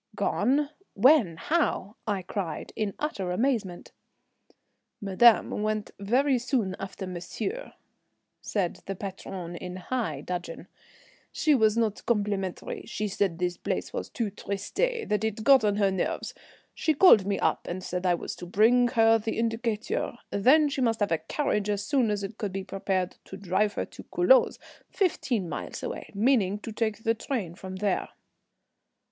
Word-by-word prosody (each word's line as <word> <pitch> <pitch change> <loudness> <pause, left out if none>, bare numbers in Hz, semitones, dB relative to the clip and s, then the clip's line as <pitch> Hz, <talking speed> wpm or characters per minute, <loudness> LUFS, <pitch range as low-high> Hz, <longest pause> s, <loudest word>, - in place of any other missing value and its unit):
"Gone? 265 +8 +1 0.2
When? 230 - +5
How?" 230 - 0
I 200 -3 -1
cried, 180 -3 -4
in 210 -2 -2
utter 200 -12 -3
amazement. 205 -3 -1 1.1
"Madame 210 +2 +4
went 215 0 -2
very 255 +6 +2
soon 235 -6 -1
after 195 0 -6
monsieur," 215 - -5 0.7
said 190 -5 -2
the 195 - -3
patronne, 185 -2 -6
in 180 +1 -6
high 185 - -3
dudgeon. 175 0 -5 0.7
"She 310 - +2
was 220 -4 +3
not 220 -3 0
complimentary, 205 -5 -1
she 210 - -2
said 195 -3 0
this 180 0 -1
place - - -3
was - - -4
too 225 -5 -2
triste, 200 -1 -6
that 460 - 0
it 220 0 -2
got 270 -1 +6
on 205 -1 +2
her 200 -2 +2
nerves. 190 -2 -2 0.4
She 315 - 0
called 230 - +7
me 200 -1 +1
up - - 0
and 185 +1 -4
said 180 0 -3
I 180 -1 +3
was - - -6
to 175 - -8
bring 230 +6 +4
her 225 -2 +4
the 220 +1 -3
Indicateur. 230 0 -1
Then 270 +10 +5
she 280 -2 -2
must 230 -3 +1
have 205 - +1
a 165 - +2
carriage 210 -9 -1
as 205 -1 -1
soon 260 -4 +2
as 205 -1 -1
it 205 +3 -7
could 205 -4 -2
be 195 0 -3
prepared 190 -2 -2
to 195 - -9
drive 200 +2 0
her - - -2
to - - -12
Culoz, - - +4 0.3
fifteen 255 - 0
miles - - -6
away, - - -5
meaning 210 -3 +2
to 225 - -6
take 220 0 -2
the 225 - +3
train 230 - -3
from 185 +1 -8
there." 200 +1 -1
210 Hz, 160 wpm, -27 LUFS, 190-240 Hz, 1.1 s, called